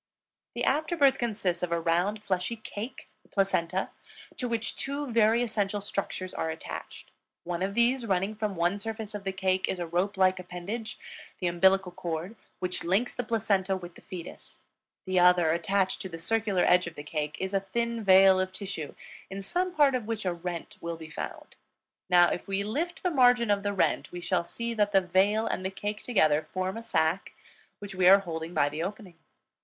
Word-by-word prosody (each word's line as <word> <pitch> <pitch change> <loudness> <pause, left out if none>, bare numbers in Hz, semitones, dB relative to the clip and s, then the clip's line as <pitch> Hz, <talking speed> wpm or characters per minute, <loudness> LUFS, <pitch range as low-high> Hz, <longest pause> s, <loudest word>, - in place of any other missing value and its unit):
The - - -2
after 315 +3 +1
birth 280 -3 +4
consists 205 -7 -1
of 180 -1 -2
a 170 - +1
round, 180 +6 0
fleshy 185 +4 -1
cake, 220 +2 -7
the - - -28
placenta, 190 -2 0 0.5
to 250 - -2
which 230 -1 -2
two 280 -1 -3
very 230 +1 +4
essential 210 -3 -1
structures 195 -2 -3
are 160 - -2
attached. 160 0 -7 0.3
One 175 0 -3
of 195 +1 -1
these, 235 +1 +2
running 195 +1 +1
from 210 -2 -3
one 175 +4 +1
surface 220 0 -5
of 205 -1 -6
the 195 - 0
cake, 190 -1 0
is 190 - -2
a 175 - -3
rope 180 +4 -1
like 185 -1 +3
appendage, 200 +5 -6 0.4
the 185 - -3
umbilical 190 +2 +3
cord, 175 +4 -4 0.2
which 180 -1 -3
links 195 +8 +1
the 245 - -3
placenta 200 -4 +1
with 175 -2 -9
the - - -15
fetus. 180 -3 -9 0.4
The 185 -1 +2
other, 175 -2 +5
attached 185 +3 0
to 190 - -5
the 165 - -7
circular 205 +1 +1
edge 180 0 +4
of 170 - -8
the 145 - -7
cake, 150 0 -3
is 190 +1 -3
a 195 - +3
thin 235 +4 -2
veil 190 -1 +7
of 185 0 -1
tissue, 185 -7 -6 0.3
in 195 0 -6
some 360 - -1
part 290 -5 +4
of 245 -4 -2
which 225 -3 -3
a 180 - +1
rent 175 -1 -6
will 170 0 -4
be 160 -1 -10
found. - - -7 0.5
Now, 175 -1 +7
if - - -4
we 195 0 0
lift 320 +12 -3
the 360 - +1
margin 245 -5 +4
of 200 -1 +2
the 205 0 -1
rent, 200 - 0
we 175 - -6
shall 175 0 0
see 235 +5 -4
that 210 -2 +1
the 195 - +6
veil 195 +5 +2
and 185 - -2
the 190 - -1
cake 205 +2 -4
together 155 -9 +2
form 185 0 -2
a 230 - -5
sac 175 -5 0 0.4
which 205 -1 -8
we 185 -1 +3
are 195 +1 +8
holding 165 -1 -5
by 145 -2 +4
the 150 +2 -4
opening. 190 -2 -6
195 Hz, 200 wpm, -28 LUFS, 175-220 Hz, 0.5 s, are